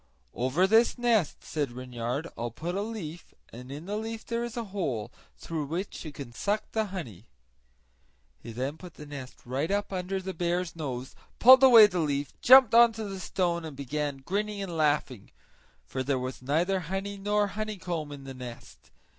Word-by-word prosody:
"Over 130 Hz, +9 st, +2 dB
this 225 Hz, +6 st, +4 dB
nest," 230 Hz, -9 st, +1 dB
said 145 Hz, -5 st, -2 dB
Reynard, 125 Hz, +4 st, -4 dB
"I'll 120 Hz, +1 st, -3 dB
put 165 Hz, +10 st, -5 dB
a 195 Hz, -, -1 dB
leaf, 190 Hz, -7 st, -7 dB, 0.2 s
and 125 Hz, +3 st, -9 dB
in 145 Hz, +4 st, -7 dB
the 205 Hz, +2 st, -3 dB
leaf 225 Hz, +1 st, -5 dB
there 235 Hz, 0 st, -2 dB
is 240 Hz, 0 st, -6 dB
a 235 Hz, -, -1 dB
hole, 125 Hz, -, -2 dB, 0.3 s
through 160 Hz, -3 st, -4 dB
which 170 Hz, +7 st, -4 dB
you 155 Hz, -, -7 dB
can 140 Hz, -4 st, -9 dB
suck 210 Hz, -, -1 dB
the 220 Hz, -1 st, 0 dB
honey." 125 Hz, -, -7 dB, 1.1 s
He 115 Hz, -, -9 dB
then 130 Hz, +6 st, -3 dB
put 180 Hz, -3 st, -11 dB
the 150 Hz, -, -10 dB
nest 140 Hz, -3 st, -9 dB
right 135 Hz, +6 st, -2 dB
up 200 Hz, 0 st, -1 dB
under 185 Hz, +1 st, -2 dB
the 190 Hz, 0 st, -5 dB
bear's 175 Hz, 0 st, -1 dB
nose, 130 Hz, -5 st, -5 dB, 0.2 s
pulled 260 Hz, +2 st, +9 dB
away 240 Hz, -5 st, +10 dB
the 185 Hz, -4 st, -1 dB
leaf, 145 Hz, -2 st, -1 dB
jumped 255 Hz, -3 st, +8 dB
on 235 Hz, 0 st, +7 dB
to 220 Hz, 0 st, -5 dB
the 195 Hz, -2 st, -5 dB
stone, 175 Hz, -2 st, -1 dB
and 155 Hz, -4 st, -8 dB
began 145 Hz, +1 st, -3 dB
grinning 205 Hz, +2 st, -2 dB
and 175 Hz, -3 st, -5 dB
laughing; 145 Hz, -7 st, 0 dB, 0.6 s
for 130 Hz, -, -4 dB
there 135 Hz, +1 st, 0 dB
was 130 Hz, 0 st, -5 dB
neither 165 Hz, +9 st, +1 dB
honey 195 Hz, +3 st, -4 dB
nor 205 Hz, +1 st, +1 dB
honeycomb 185 Hz, -7 st, -4 dB
in 140 Hz, -1 st, -8 dB
the 135 Hz, 0 st, -8 dB
nest. 125 Hz, -2 st, -10 dB
170 Hz, 185 wpm, -28 LUFS, 140-205 Hz, 1.1 s, away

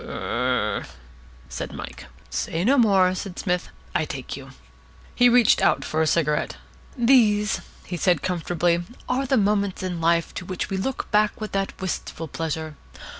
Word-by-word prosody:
"Ur 125 Hz, -4 st, -1 dB
r," -, -, -9 dB, 0.6 s
said 65 Hz, -, -5 dB
Mike. -, -, -8 dB, 0.2 s
"Say 165 Hz, +2 st, -2 dB
no 265 Hz, +6 st, +4 dB
more," 190 Hz, -5 st, +5 dB
said 185 Hz, 0 st, -6 dB
Psmith. 180 Hz, -2 st, -1 dB, 0.2 s
"I -, -, +1 dB
take -, -, -5 dB
you." -, -, -10 dB, 0.6 s
He 245 Hz, 0 st, +5 dB
reached 240 Hz, -2 st, +5 dB
out -, -, +2 dB
for 155 Hz, -, 0 dB
a 160 Hz, -, +2 dB
cigarette. 150 Hz, -1 st, +1 dB, 0.4 s
"These," 220 Hz, -5 st, +4 dB, 0.2 s
he 175 Hz, -, -4 dB
said, 175 Hz, -3 st, +2 dB
comfortably, 175 Hz, -1 st, +1 dB, 0.3 s
"are 265 Hz, +2 st, 0 dB
the 265 Hz, -, +3 dB
moments 200 Hz, -2 st, +1 dB
in 180 Hz, -3 st, -3 dB
life 170 Hz, 0 st, +2 dB
to 180 Hz, -, -6 dB
which 185 Hz, +2 st, -4 dB
we 190 Hz, -, 0 dB
look 255 Hz, +8 st, -3 dB
back 210 Hz, 0 st, +2 dB
with 215 Hz, -1 st, -5 dB
that 195 Hz, 0 st, -2 dB
wistful 175 Hz, -3 st, -4 dB
pleasure. 160 Hz, 0 st, -4 dB
185 Hz, 165 wpm, -24 LUFS, 165-210 Hz, 0.6 s, more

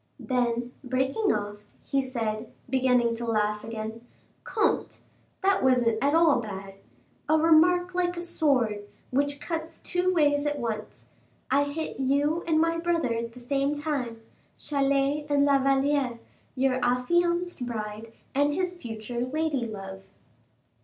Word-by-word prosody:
Then 245 Hz, -1 st, -1 dB
breaking 265 Hz, -, +1 dB
off, 205 Hz, 0 st, -2 dB, 0.3 s
he 275 Hz, -, +1 dB
said, 225 Hz, -4 st, -3 dB, 0.2 s
beginning 250 Hz, -2 st, +2 dB
to 235 Hz, -, -5 dB
laugh 210 Hz, -1 st, 0 dB
again, 220 Hz, 0 st, -6 dB, 0.4 s
"Comte, 425 Hz, -2 st, 0 dB, 0.4 s
that 390 Hz, 0 st, +3 dB
wasn't 240 Hz, -4 st, +3 dB
at 285 Hz, +2 st, +3 dB
all 325 Hz, -5 st, +5 dB
bad! 195 Hz, -3 st, -7 dB, 0.6 s
a 315 Hz, -, +5 dB
remark 350 Hz, +3 st, +4 dB
like 355 Hz, -1 st, 0 dB
a -, -, -2 dB
sword, 275 Hz, -11 st, +1 dB, 0.3 s
which 285 Hz, +2 st, 0 dB
cuts 325 Hz, 0 st, -5 dB
two 360 Hz, +1 st, 0 dB
ways 295 Hz, -4 st, +2 dB
at 295 Hz, 0 st, -1 dB
once. 215 Hz, -, -5 dB, 0.5 s
I 285 Hz, +2 st, +4 dB
hit 295 Hz, 0 st, -5 dB
you 285 Hz, +5 st, +1 dB
and 315 Hz, -1 st, +3 dB
my 330 Hz, +1 st, +2 dB
brother 335 Hz, -7 st, 0 dB
at 230 Hz, 0 st, -4 dB
the 250 Hz, -, -11 dB
same 275 Hz, +3 st, 0 dB
time, 270 Hz, -7 st, -3 dB, 0.3 s
Chalais 280 Hz, +1 st, 0 dB
and 285 Hz, -1 st, +4 dB
La 280 Hz, -1 st, +4 dB
Valliere, 270 Hz, -2 st, +1 dB, 0.4 s
your 260 Hz, -1 st, +1 dB
affianced 345 Hz, +6 st, +1 dB
bride 215 Hz, -1 st, -5 dB, 0.2 s
and 290 Hz, +1 st, +2 dB
his 365 Hz, 0 st, -1 dB
future 235 Hz, -5 st, -6 dB
lady 280 Hz, -2 st, -1 dB
love." 195 Hz, -2 st, -8 dB
275 Hz, 140 wpm, -27 LUFS, 235-315 Hz, 0.6 s, all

